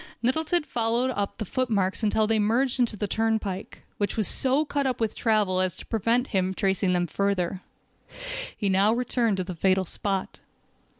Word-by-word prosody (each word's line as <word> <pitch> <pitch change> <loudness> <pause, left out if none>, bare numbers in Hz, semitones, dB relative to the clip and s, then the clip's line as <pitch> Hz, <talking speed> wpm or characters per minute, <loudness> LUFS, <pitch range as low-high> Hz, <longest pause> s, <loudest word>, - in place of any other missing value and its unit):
Nettleton 320 +7 +1
followed 240 -1 0
up 200 -3 -3
the 215 - -3
footmarks 205 -4 0
until 215 0 +2
they 220 0 +2
merged 240 +5 +1
into 235 -3 +1
the 205 - -1
turnpike, 220 -3 -2 0.2
which 205 +1 -1
was 215 - +2
so 270 +4 +1
cut 285 -2 -1
up 255 - -1
with 225 -2 -1
travel 210 -5 +2
as 185 -2 0
to - - -10
prevent 230 +3 +1
him 190 -1 0
tracing 190 -1 +1
them 175 0 +1
further. 190 0 -1 1.0
He 205 - -1
now 195 +3 +4
returned 235 -3 +1
to 185 - 0
the 180 +1 -6
fatal 190 +2 +2
spot. 195 +2 -3
215 Hz, 175 wpm, -26 LUFS, 190-240 Hz, 1.0 s, now